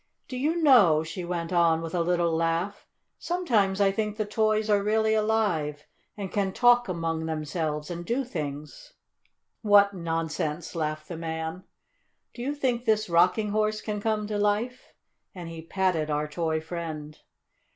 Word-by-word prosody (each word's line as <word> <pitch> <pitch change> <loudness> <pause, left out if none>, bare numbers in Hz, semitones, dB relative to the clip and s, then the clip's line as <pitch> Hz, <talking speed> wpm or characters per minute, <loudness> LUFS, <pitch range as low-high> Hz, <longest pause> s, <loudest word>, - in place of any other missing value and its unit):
"Do 255 - -6
you 295 +6 0
know," 200 - +6
she 175 +3 -6
went 170 0 -3
on 170 -2 +4
with 165 - -6
a 175 - +1
little 170 -1 +1
laugh, 165 +5 -1 0.3
"sometimes 225 - +1
I 200 -1 +4
think 210 +1 -2
the 215 - -1
toys 215 0 +1
are 205 -1 +3
really 220 +1 +2
alive, 205 -10 0 0.3
and 195 -3 -5
can 195 -2 0
talk 245 +1 +4
among 165 -2 -2
themselves, 155 0 -3
and 175 0 -5
do 240 +9 -1
things." 150 - -6 0.7
"What 205 -2 +5
nonsense!" 165 -2 -3
laughed 155 -2 -3
the 170 - -6
man. 160 +2 -5 0.7
"Do 240 - -8
you 280 +4 -2
think 250 -4 0
this 215 -3 +2
Rocking 180 +5 +3
Horse 215 +1 0
can 210 -1 -4
come 215 -1 0
to 205 0 -2
life?" 210 +5 -1 0.4
and 175 -2 -7
he 165 -1 -7
patted 170 -2 0
our 150 0 0
toy 160 +1 -1
friend. 160 -2 -6
180 Hz, 160 wpm, -27 LUFS, 160-215 Hz, 0.7 s, know